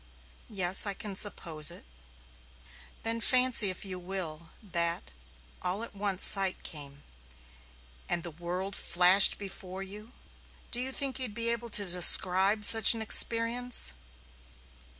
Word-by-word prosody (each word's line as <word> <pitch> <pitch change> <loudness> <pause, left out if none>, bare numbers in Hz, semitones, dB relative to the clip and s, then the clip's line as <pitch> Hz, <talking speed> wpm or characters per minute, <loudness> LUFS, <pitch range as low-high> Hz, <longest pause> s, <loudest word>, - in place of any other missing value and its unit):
"Yes, 190 -1 +2
I 200 - -3
can 205 -1 -8
suppose 165 -7 -2
it." - - -13 1.2
"Then 230 0 -1
fancy 250 -4 +2
if 185 +2 -7
you 185 -1 -7
will 170 -3 -8
that 170 -3 -4 0.5
all 185 +5 -4
at - - -9
once 200 -2 0
sight 195 -2 +3
came, 145 -2 -9 1.1
and 170 -1 -3
the 170 - -7
world 180 +4 -7
flashed 180 +3 +3
before 190 -1 -10
you. 210 +4 -14 0.6
Do 240 - -1
you 260 +1 -5
think 270 -1 -3
you'd 245 -5 -7
be 230 0 -2
able 235 0 -4
to 205 -1 0
describe 185 +3 +3
such 225 +1 +9
an 225 - -8
experience?" 230 +3 0
195 Hz, 130 wpm, -27 LUFS, 180-225 Hz, 1.2 s, such